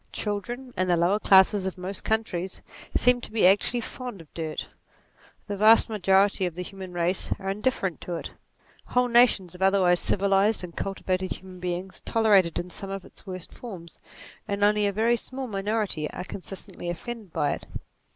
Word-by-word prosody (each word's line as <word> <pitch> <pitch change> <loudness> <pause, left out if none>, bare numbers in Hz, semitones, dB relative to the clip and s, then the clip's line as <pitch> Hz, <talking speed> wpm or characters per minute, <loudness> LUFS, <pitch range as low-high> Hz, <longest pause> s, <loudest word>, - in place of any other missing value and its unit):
Children, 240 +5 -4
and 185 -1 0
the 175 - +4
lower 180 +5 +2
classes 190 -1 +5
of 190 - -5
most 185 +2 -6
countries, 190 -5 -2 0.3
seem 250 0 +4
to - - -8
be 220 -4 +3
actually 205 +6 +4
fond 245 -3 -7
of 160 -3 -15
dirt: 160 -2 -4 0.8
the 205 - -4
vast 215 +4 +6
majority 195 -2 +3
of 170 - -7
the 180 - -4
human 190 0 -8
race 175 +1 -1
are 195 0 -3
indifferent 200 -4 -1
to 175 - -4
it: 165 - -6 0.5
whole 250 0 +2
nations 235 -7 +4
of 180 - -12
otherwise 190 -2 +4
civilized 200 +1 +2
and 170 -2 -8
cultivated 190 -1 -2
human 185 -1 -11
beings 180 +1 -4
tolerate 210 -5 +4
it 165 - -6
in 180 +1 -4
some 195 - -7
of 195 -1 -5
its - - -16
worst 185 -2 -7
forms, 180 -9 -10 0.5
and 200 0 -1
only 210 0 +4
a - - +1
very 225 +4 +2
small 260 +3 -6
minority 200 -7 -2
are 180 - -6
consistently 185 -1 -8
offended 210 +3 -6
by 145 -2 0
it. - - -5
195 Hz, 180 wpm, -26 LUFS, 180-215 Hz, 0.8 s, vast